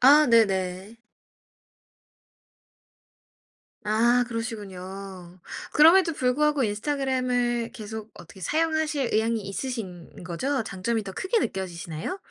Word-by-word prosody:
아 290 +4 +7
네네. 195 -2 +2 2.9
아 235 +3 +3
그러시군요. 195 -5 -7 0.3
그럼에도 330 +3 +6
불구하고 290 +2 +1
인스타그램을 245 0 0
계속 220 0 -7
어떻게 195 - -13
사용하실 315 - 0
의향이 225 +1 +1
있으신 195 -5 -6
거죠? 255 +10 -1
장점이 220 +3 -2
더 200 - -7
크게 385 - 0
느껴지시나요? 175 - -4
230 Hz, 255 characters per minute, -26 LUFS, 195-270 Hz, 2.9 s, 아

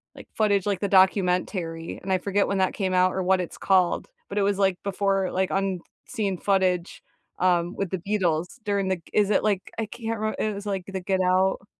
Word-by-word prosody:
like, - - -12
footage, 205 -3 +2
like, 200 -3 0
the 200 - -1
documentary? 180 -3 +1
And 190 0 -1
I - - +4
forget 200 +2 0
when 200 -1 -1
that 185 - +1
came 190 -2 -1
out 185 0 +4
or 190 - -1
what 185 0 +3
it's 175 - -7
called. 185 -2 +2 0.2
But, - - -5
it - - +3
was, 200 0 +1
like, 190 -2 +2
before, 195 -1 0
like, 190 0 0
unseen 195 +1 -3
footage, 185 -3 0 0.4
um, 175 -1 +2
with 195 -3 -2
the 190 - -2
Beatles 175 -4 0 0.2
during 200 -2 0
the 190 - +2
g 165 - -22
is 205 -1 +3
it, 205 - +2
like, 200 -3 -1
I 225 - -1
can't 225 -1 -4
remem 215 0 -1
it 215 -1 0
was, 200 +1 -7
like, 195 -3 -3
the 190 -1 -4
Get 190 0 0
Out? 190 +2 +2
190 Hz, 220 wpm, -25 LUFS, 185-200 Hz, 0.4 s, I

